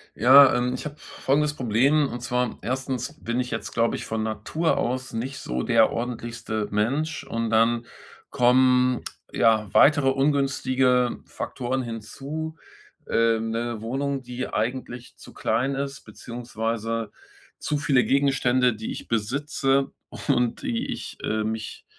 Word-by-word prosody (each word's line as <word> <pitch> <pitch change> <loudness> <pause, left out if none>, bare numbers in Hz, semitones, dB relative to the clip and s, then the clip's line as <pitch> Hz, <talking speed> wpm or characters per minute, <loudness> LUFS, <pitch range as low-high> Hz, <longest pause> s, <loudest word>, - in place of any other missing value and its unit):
Ja, 130 +4 +8
ähm, 125 +1 0
ich 130 - -5
habe 145 -1 -5
folgendes 150 0 0
Problem. 135 +4 +2
Und 120 +1 -6
zwar 125 -1 -1
1. 130 -1 -3
bin 120 +2 -1
ich 125 -1 -2
jetzt, 115 -3 -4
glaube 115 0 +1
ich, - - -5
von 110 0 -2
Natur 110 +10 -1
aus 130 +1 -2
nicht 125 +4 -4
so 60 0 -3
der - - +4
ordentlichste 115 -2 -4
Mensch. 140 +10 0
Und 115 -4 -3
dann 115 +1 +2 0.4
kommen 125 0 +4 0.3
ja 110 -2 +3
weitere 145 -2 +5
ungünstige 135 -2 +2
Faktoren 130 +1 -3
hinzu. 135 +8 -6 0.5
Ähm, 115 -1 +2
'ne 115 -1 -3
Wohnung, 135 +4 -2
die 125 0 -5
eigentlich 120 +1 -3
zu - - -13
klein 125 +5 0
ist, 140 0 -4
beziehungsweise 115 -1 -4 0.5
zu 150 - -1
viele 135 -3 +3
Gegenstände, 130 -3 +2
die 110 +1 -5
ich - - -7
besitze 135 +4 0 0.4
und 125 -4 +1
die 115 - -2
ich, - - -6
äh, 110 0 0
mich 110 -1 -5
125 Hz, 135 wpm, -25 LUFS, 115-135 Hz, 0.5 s, Ja